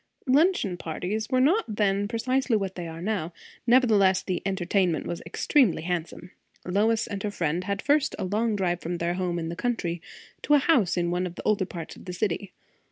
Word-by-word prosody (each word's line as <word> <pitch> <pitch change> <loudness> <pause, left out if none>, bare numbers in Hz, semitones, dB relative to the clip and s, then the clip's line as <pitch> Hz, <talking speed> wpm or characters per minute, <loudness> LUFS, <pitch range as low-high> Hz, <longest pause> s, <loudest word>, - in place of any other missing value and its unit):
Luncheon 270 - +3
parties 180 +7 -3
were 255 -1 +2
not 280 - +2
then 205 -1 +1
precisely 250 +2 +1
what 195 -2 -3
they 175 -2 -6
are 165 +1 -7
now; 190 -5 -2 0.3
nevertheless 215 -7 +4
the 185 - -2
entertainment 185 -3 0
was 170 - -4
extremely 190 - +2
handsome. 175 0 -4 0.3
Lois 215 +5 +2
and 200 -1 -5
her 210 - -1
friend 175 -2 -2
had 200 0 -2
first 290 0 +2
a - - -3
long 215 +4 0
drive 180 -3 -1
from 175 +2 -3
their 170 +1 -1
home 180 -1 -2
in 165 -1 -3
the 170 - -4
country 175 -6 -2 0.4
to 295 - +4
a - - +7
house 250 - +2
in 175 -1 0
one 180 +1 0
of 175 - -9
the - - -8
older 205 -3 +2
parts 170 -4 -7
of - - -14
the 180 - -5
city. 190 0 -2
195 Hz, 200 wpm, -26 LUFS, 175-225 Hz, 0.4 s, a